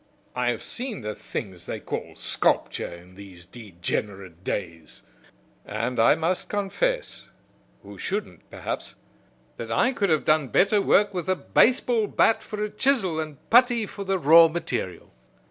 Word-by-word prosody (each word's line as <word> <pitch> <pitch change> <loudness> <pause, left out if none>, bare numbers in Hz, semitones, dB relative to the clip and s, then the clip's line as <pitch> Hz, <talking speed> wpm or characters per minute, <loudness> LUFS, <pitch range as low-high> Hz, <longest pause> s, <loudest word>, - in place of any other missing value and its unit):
I 125 -1 -1
have 120 - -3
seen 245 - -3
the 105 -1 -4
things 95 -4 -7
they - - -4
call - - -6
sculpture - - +1
in 85 +1 -13
these 95 -3 -12
degenerate 95 -2 -5
days, 85 -6 -5 0.6
and 115 +4 -3
I 115 - +5
must 170 +3 -2
confess - - -2 0.5
who - - -12
shouldn't, - - -5
perhaps - - -6 0.6
that - - -6
I 255 - +2
could 200 -5 0
have 155 -2 +1
done 155 -2 +3
better 200 - +3
work 205 +1 +3
with 180 0 -4
a 185 - +3
baseball 235 0 +2
bat 225 - +2
for 210 -1 -5
a 210 - -2
chisel 220 - +1
and 155 -3 -7
putty 240 -1 +5
for 200 0 -7
the 195 0 0
raw 165 +1 +7
material." 155 - -5
160 Hz, 150 wpm, -25 LUFS, -, 0.6 s, raw